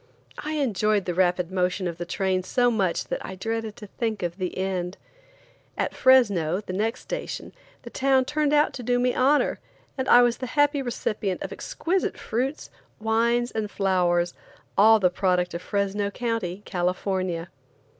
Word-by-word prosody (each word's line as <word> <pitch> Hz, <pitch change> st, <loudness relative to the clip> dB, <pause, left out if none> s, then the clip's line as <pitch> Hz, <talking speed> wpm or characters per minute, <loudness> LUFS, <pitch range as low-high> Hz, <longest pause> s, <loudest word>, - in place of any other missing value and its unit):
I 305 Hz, +1 st, -4 dB
enjoyed 215 Hz, -8 st, +1 dB
the 180 Hz, -, -1 dB
rapid 180 Hz, 0 st, +1 dB
motion 185 Hz, 0 st, 0 dB
of 170 Hz, -1 st, -5 dB
the 175 Hz, -, -4 dB
train 185 Hz, 0 st, 0 dB
so 245 Hz, +6 st, +2 dB
much 195 Hz, -6 st, 0 dB
that -, -, -3 dB
I 190 Hz, -, -6 dB
dreaded 225 Hz, +2 st, -3 dB
to 210 Hz, -, -10 dB
think 220 Hz, -1 st, -3 dB
of 175 Hz, 0 st, -3 dB
the 185 Hz, -2 st, -4 dB
end. 185 Hz, -1 st, -2 dB, 0.8 s
At -, -, -1 dB
Fresno, 200 Hz, -, +4 dB
the 200 Hz, -3 st, -7 dB
next 220 Hz, +6 st, -1 dB
station, -, -, -5 dB, 0.3 s
the -, -, -9 dB
town 265 Hz, -1 st, +2 dB
turned 295 Hz, +1 st, 0 dB
out 295 Hz, 0 st, +3 dB
to 255 Hz, -, -6 dB
do 245 Hz, +1 st, +1 dB
me 250 Hz, 0 st, +2 dB
honor, 280 Hz, +3 st, +2 dB, 0.4 s
and 260 Hz, -, -1 dB
I 245 Hz, -, +8 dB
was 240 Hz, -1 st, +2 dB
the 255 Hz, -, -5 dB
happy 290 Hz, 0 st, +3 dB
recipient 215 Hz, -6 st, -2 dB
of -, -, -5 dB
exquisite 365 Hz, +3 st, -2 dB
fruits, 265 Hz, +6 st, -3 dB, 0.3 s
wines 235 Hz, +2 st, +1 dB
and 215 Hz, -2 st, -3 dB
flowers, 175 Hz, -3 st, +1 dB, 0.4 s
all 220 Hz, +2 st, +6 dB
the 180 Hz, -3 st, +3 dB
product 180 Hz, -1 st, +1 dB
of 170 Hz, -, -4 dB
Fresno 200 Hz, +1 st, -1 dB
County, 205 Hz, -4 st, -3 dB
California. 180 Hz, -1 st, -2 dB
205 Hz, 165 wpm, -25 LUFS, 185-245 Hz, 0.8 s, I